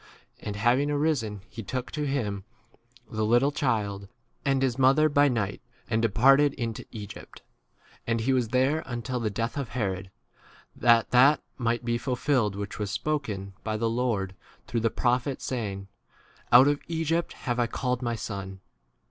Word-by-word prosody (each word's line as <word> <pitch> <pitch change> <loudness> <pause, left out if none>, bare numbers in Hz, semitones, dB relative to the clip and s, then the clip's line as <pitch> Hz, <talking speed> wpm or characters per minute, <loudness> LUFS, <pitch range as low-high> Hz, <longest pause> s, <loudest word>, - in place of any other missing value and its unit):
And, 105 - -5
having 120 +7 +2
arisen, 140 -9 0
he 115 - -8
took 125 +5 -4
to 150 -1 -2
[him] 105 -8 -2 0.7
the 110 0 -1
little 120 +6 +3
child 105 -8 -1 0.4
and 135 -2 +1
his 130 -1 0
mother 135 +4 +5
by 145 0 +4
night, 110 -7 -1 0.3
and 110 -1 +1
departed 135 +6 +4
into 115 -3 -4
Egypt. 105 -3 -10 0.5
15 - - -37
And 115 -1 +1
he 135 +4 +1
was 125 -3 +1
there 130 +6 +2
until 125 0 -3
the 115 -2 -1
death 115 +5 -3
of 135 -5 -4
Herod, 95 -6 -3 0.7
that 115 -1 +4
that 135 +4 +5
might 120 -1 -1
be 120 0 0
ful 125 0 -2
filled 120 -7 +1
which 100 +1 -6
was 105 -1 -2
spoken 105 -7 -3
by 110 -1 -2
[the] 115 +1 0
Lord 115 -6 -1 0.3
through 120 - -1
the 115 0 +2
prophet, 125 +4 0
saying, 100 -6 -4 0.6
Out 125 +3 +8
of 145 0 +1
Egypt 165 0 -1
have 120 -1 -3
I 120 - +2
called 125 +1 -2
my 120 -2 -1
16 110 - -5
son. 95 -2 -6
120 Hz, 170 wpm, -27 LUFS, 110-135 Hz, 0.7 s, Out